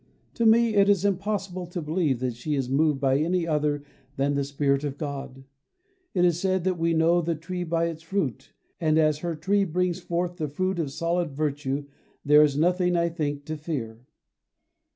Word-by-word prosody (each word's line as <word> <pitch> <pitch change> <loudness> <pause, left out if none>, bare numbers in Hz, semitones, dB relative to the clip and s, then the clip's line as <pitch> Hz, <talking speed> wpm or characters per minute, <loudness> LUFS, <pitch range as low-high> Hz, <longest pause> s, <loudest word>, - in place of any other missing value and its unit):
To 230 -2 +2
me 230 0 +5
it 200 -1 +4
is 200 -1 +3
impossible 195 -2 -2
to 175 +1 -5
believe 155 -5 0
that 125 -2 -1
she 145 +5 -3
is 130 -2 -2
moved 150 0 +2
by 135 0 +2
any 170 +2 +1
other 150 -2 0 0.3
than 140 +1 +1
the 140 0 0
Spirit 140 0 0
of 145 -1 -3
God. 140 -3 -6 0.7
It 180 -1 +4
is 175 -1 +2
said 190 -1 0
that 185 -2 0
we 165 0 +1
know 165 +2 +3
the 170 0 -1
tree 175 +3 -5
by 165 0 0
its 165 -1 -4
fruit, 160 - -3 0.3
and 155 -2 +2
as 155 -2 +3
her 170 0 -3
tree 195 +6 +1
brings 180 0 -1
forth 175 0 -2
the 155 -4 -2
fruit 185 +5 -2
of 150 -5 -2
solid 170 0 -1
virtue 145 -1 -2 0.4
there 150 +1 +7
is 145 -2 +3
nothing, 180 +2 +2
I 170 0 +2
think, 145 -4 -3
to 155 - -4
fear. 130 -7 -5
160 Hz, 195 wpm, -26 LUFS, 145-180 Hz, 0.7 s, there